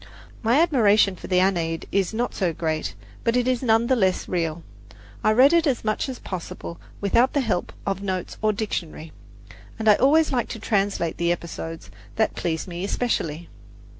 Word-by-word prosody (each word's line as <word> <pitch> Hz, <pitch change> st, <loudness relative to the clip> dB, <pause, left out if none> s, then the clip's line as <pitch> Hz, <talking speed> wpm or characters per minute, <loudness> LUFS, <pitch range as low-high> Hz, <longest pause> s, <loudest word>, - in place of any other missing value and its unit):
My 235 Hz, +5 st, +3 dB
admiration 215 Hz, -, +4 dB
for -, -, -10 dB
the 180 Hz, -1 st, +3 dB
Aeneid 170 Hz, -4 st, 0 dB
is 195 Hz, -2 st, +1 dB
not 235 Hz, +2 st, -2 dB
so 180 Hz, -4 st, 0 dB
great, 155 Hz, -1 st, -2 dB, 0.3 s
but 230 Hz, +1 st, +2 dB
it 250 Hz, 0 st, +1 dB
is 255 Hz, -2 st, +1 dB
none 225 Hz, -2 st, +3 dB
the 260 Hz, -, +3 dB
less 190 Hz, -5 st, +1 dB
real. 165 Hz, -2 st, -2 dB, 0.6 s
I -, -, +4 dB
read 260 Hz, +7 st, +6 dB
it 335 Hz, -1 st, +4 dB
as 265 Hz, -4 st, 0 dB
much 215 Hz, +5 st, -1 dB
as 255 Hz, -, -5 dB
possible 170 Hz, -2 st, -7 dB, 0.2 s
without 235 Hz, +6 st, +2 dB
the 285 Hz, -, +2 dB
help 215 Hz, -8 st, -1 dB
of 195 Hz, -1 st, -2 dB
notes 185 Hz, -3 st, -3 dB
or 215 Hz, 0 st, +3 dB
dictionary, 170 Hz, -7 st, -4 dB, 0.7 s
and 220 Hz, -1 st, -3 dB
I 210 Hz, -, +9 dB
always 305 Hz, +5 st, +4 dB
like 245 Hz, -3 st, 0 dB
to 225 Hz, -, -6 dB
translate 200 Hz, -6 st, 0 dB
the 170 Hz, 0 st, +1 dB
episodes 165 Hz, -, -5 dB, 0.2 s
that 220 Hz, -, +1 dB
please 160 Hz, +2 st, -3 dB
me 175 Hz, 0 st, -5 dB
especially. 175 Hz, -7 st, -2 dB
200 Hz, 180 wpm, -24 LUFS, 170-240 Hz, 0.7 s, I